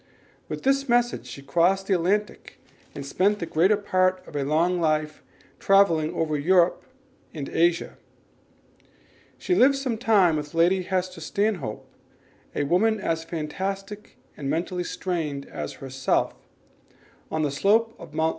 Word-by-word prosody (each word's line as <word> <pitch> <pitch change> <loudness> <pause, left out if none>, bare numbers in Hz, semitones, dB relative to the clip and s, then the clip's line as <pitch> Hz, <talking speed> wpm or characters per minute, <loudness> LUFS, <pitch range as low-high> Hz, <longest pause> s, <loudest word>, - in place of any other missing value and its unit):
With - - -5
this 275 0 +1
message 240 0 +1
she 140 - -9
crossed 180 +6 +2
the 195 - +1
Atlantic 195 +4 -1 0.4
and 140 - -6
spent 195 +9 +1
the 170 - -4
greater 185 +7 +3
part 185 -2 0
of - - -12
a 145 - 0
long 165 +5 +1
life 155 -1 0 0.2
in - - -29
travelling 170 -6 +3
over 155 -2 -1
Europe 175 +3 +3 0.5
and 140 -3 -5
Asia. 170 +1 0 1.4
She 370 - -1
lived 275 -5 +5
some 260 -5 -3
time 200 -9 +4
with 150 +1 -6
Lady 175 +3 +3
Hester 185 -1 -3
Stanhope, 180 - -2 0.7
a - - 0
woman 210 +9 +2
as 165 -4 -2
fantastic 195 +6 -5 0.2
and 140 -2 -5
mentally 180 +3 -2
strained 160 -7 -3
as - - -6
herself, 135 -1 -1 1.0
on 155 0 -1
the 145 - 0
slope 220 +10 +2
of 155 -3 -12
Mt. 160 0 +2
180 Hz, 145 wpm, -25 LUFS, 155-200 Hz, 1.4 s, lived